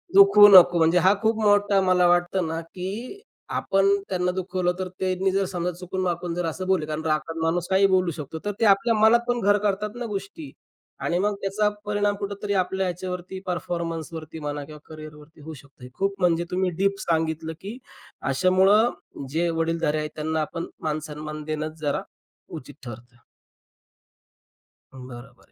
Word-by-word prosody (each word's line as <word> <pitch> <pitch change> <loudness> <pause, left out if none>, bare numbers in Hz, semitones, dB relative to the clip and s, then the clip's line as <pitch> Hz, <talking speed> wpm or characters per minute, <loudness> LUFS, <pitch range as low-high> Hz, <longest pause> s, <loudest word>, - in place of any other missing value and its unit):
दुखवू 395 - +9
नको. 180 -3 +8
म्हणजे 165 +1 +3
हा 185 +3 +5
खूप 220 0 +1
मोठा 205 -1 +3
मला 185 -1 +3
वाटतं 175 +1 +2
ना, 165 +1 -3
की 200 - -7 0.4
आपण 195 0 +1 0.2
त्यांना 180 -1 0
दुखवलं 180 -1 -1
तर 185 - -2
त्यांनी 190 0 0
जर 195 +1 +1
समजा 180 -1 -3
चुकून-वाकून 180 -1 -3
जर 175 - -2
असं 185 +3 -4
बोलले. 185 -5 +1
कारण 155 +1 -4
रागात 155 +1 -1
माणूस 170 +1 0
काहीही 195 +1 +4
बोलू 185 -2 +2
शकतो. 150 +1 -7
तर 205 - 0
ते 225 - +2
आपल्या 205 +3 +4
मनात 220 +2 +6
पण 245 0 0
घर 205 0 +4
करतात 205 +2 -2
ना 240 0 -5
गोष्टी. 210 +8 -6 0.5
आणि 175 - -1
मग 205 +1 0
त्याचा 205 +2 +1 0.2
परिणाम 205 0 0
कुठेतरी 200 0 -4
आपल्या 190 0 0
ह्याच्यावरती, 180 +1 -5
परफॉर्मन्सवरती 165 -2 -4
म्हणा 145 -1 -4
किंवा 150 +1 -12
कॅरियरवरती 155 0 -12
होऊ 160 +2 -8
शकतं. 140 -3 -14
खूप 195 +6 -1
म्हणजे 170 -2 +2
तुम्ही 185 0 0
डीप 195 0 +1
सांगितलं, 160 -1 -1
की 205 +5 -7 0.5
अशामुळं 190 - +2
जे 170 +4 0
वडीलधारे 165 -2 0
आहेत 150 0 -3
त्यांना 155 +1 -2
आपण 165 +2 -4 0.2
मानसन्मान 155 0 -5
देणंच 155 +1 -4
जरा, 145 -2 -1 0.5
उचित 145 -3 -9
ठरतं. 120 +1 -10 1.8
बरं, 125 0 -11
बरं. - - -26
180 Hz, 160 wpm, -24 LUFS, 160-195 Hz, 1.8 s, दुखवू